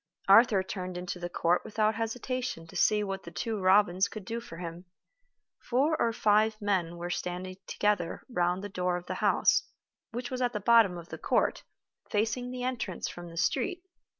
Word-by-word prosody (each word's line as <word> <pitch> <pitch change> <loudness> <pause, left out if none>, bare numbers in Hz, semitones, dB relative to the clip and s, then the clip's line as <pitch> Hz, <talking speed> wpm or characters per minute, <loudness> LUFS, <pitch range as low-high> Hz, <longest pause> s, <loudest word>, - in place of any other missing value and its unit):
Arthur 200 -1 +6
turned 185 -2 -5
into 180 0 -5
the 175 0 -4
court 175 0 +1
without 215 0 +1
hesitation 225 -4 -3
to 165 - -14
see 210 -1 +3
what 195 -1 -4
The - - -9
Two 220 +5 -3
Robins 190 -1 +4
could 205 +1 -9
do 230 +4 -3
for 200 -8 -10
him. 170 +1 -7 0.7
Four 280 +6 +1
or 230 - +3
five 215 0 +2
men 185 -5 0
were 175 +1 -4
standing 180 +1 -4
together 205 -5 0
round 180 -5 0
the - - -3
door 180 -2 -1
of 180 - -9
the - - -3
house, - - +4 0.5
which 245 +3 -5
was 255 0 -3
at 245 -1 +1
the 210 - -2
bottom 220 -4 +5
of 170 0 -10
the - - -7
court, - - +1 0.5
facing 225 +4 0
the 250 0 -5
entrance 245 -8 -3
from 175 0 -9
the 165 - -11
street. 270 - 0
200 Hz, 185 wpm, -29 LUFS, 180-230 Hz, 0.7 s, Arthur